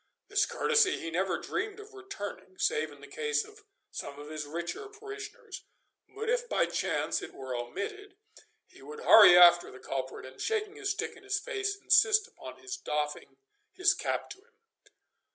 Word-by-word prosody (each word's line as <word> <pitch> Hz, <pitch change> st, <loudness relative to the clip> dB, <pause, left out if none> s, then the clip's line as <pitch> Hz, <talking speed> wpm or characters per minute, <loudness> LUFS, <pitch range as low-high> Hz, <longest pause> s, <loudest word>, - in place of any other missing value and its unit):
This 405 Hz, 0 st, +2 dB
courtesy 450 Hz, -5 st, +2 dB
he 165 Hz, -, -5 dB
never 185 Hz, +3 st, 0 dB
dreamed 425 Hz, -2 st, -4 dB
of 425 Hz, 0 st, -12 dB
returning, 205 Hz, -, -8 dB
save 155 Hz, 0 st, 0 dB
in 145 Hz, -1 st, -15 dB
the 140 Hz, -, -11 dB
case 150 Hz, 0 st, -1 dB
of 425 Hz, +1 st, -17 dB, 0.3 s
some 140 Hz, 0 st, -7 dB
of 145 Hz, +1 st, -9 dB
his 155 Hz, -1 st, -5 dB
richer 170 Hz, -, -5 dB
parishioners; 415 Hz, -1 st, -9 dB, 0.5 s
but 440 Hz, +2 st, -5 dB
if 485 Hz, +1 st, 0 dB
by -, -, +2 dB
chance -, -, -1 dB
it -, -, -9 dB
were 130 Hz, -1 st, -6 dB
omitted, 375 Hz, -, -6 dB, 0.5 s
he -, -, -19 dB
would 450 Hz, +1 st, -9 dB
hurry 205 Hz, -, +9 dB
after 175 Hz, -1 st, +7 dB
the 130 Hz, -, -12 dB
culprit, 130 Hz, 0 st, -5 dB
and, 130 Hz, 0 st, -11 dB
shaking 430 Hz, -2 st, -1 dB
his 410 Hz, -2 st, -3 dB
stick 445 Hz, +3 st, -3 dB
in -, -, -15 dB
his 400 Hz, 0 st, -1 dB
face, 405 Hz, -3 st, -3 dB
insist 430 Hz, -1 st, +4 dB
upon -, -, -11 dB
his 390 Hz, 0 st, -6 dB
doffing 150 Hz, -, -4 dB, 0.4 s
his 390 Hz, +1 st, +3 dB
cap -, -, -3 dB
to 405 Hz, -, -10 dB
him. 470 Hz, +4 st, -28 dB
390 Hz, 175 wpm, -30 LUFS, -, 0.5 s, hurry